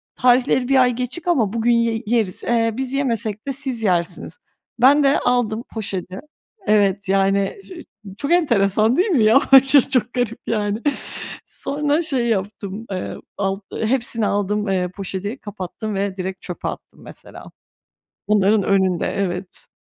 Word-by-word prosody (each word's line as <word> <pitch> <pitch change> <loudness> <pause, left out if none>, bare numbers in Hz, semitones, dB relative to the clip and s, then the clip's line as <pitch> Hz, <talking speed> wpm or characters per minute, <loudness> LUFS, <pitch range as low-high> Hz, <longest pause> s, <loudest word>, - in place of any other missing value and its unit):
"Tarihleri 250 0 +3
bir 270 -1 +4
ay 250 - +4
geçik 255 +8 -5
ama 235 - +2
bugün 235 +1 +1
ye 230 -1 +1
yeriz, 215 -4 0
eee, 230 -2 +1
biz 265 0 -3
yemesek 230 -4 -2
de 275 - -1
siz 255 -4 -4
yersiniz." 175 - -1 0.4
Ben 280 +4 +6
de 275 +1 +3
aldım 235 -2 0
poşeti. 190 -4 -4 0.5
Evet, 200 -2 +2
yani, 195 - +1
ç - - -19
ço 370 - -9 0.4
çok 285 - -2
enteresan 225 - +3
değil 380 +5 +3
mi? 265 - +3
Ya, 225 +6 +6
aşırı 270 0 +6
çok 250 -3 0
garip, 245 -2 -2
yani. 210 -1 -1 0.7
Sonra 295 +2 -1
şey 270 -7 -1
yaptım, 205 0 -3
eee, 185 -1 -4 0.2
ald 195 0 -1 0.3
hepsini 230 -2 0
aldım, 205 +1 -1
eee, 185 -2 0
poşeti, 195 +5 -4
kapattım 205 +1 -6
ve 195 0 -2
direkt 190 0 -5
çöpe 180 - -6
attım, - - -8
mesela. - - -11 0.8
Onların 210 0 +3
önünde, 190 -2 +1
evet. 185 -1 -4
220 Hz, 150 wpm, -20 LUFS, 195-255 Hz, 0.8 s, Ben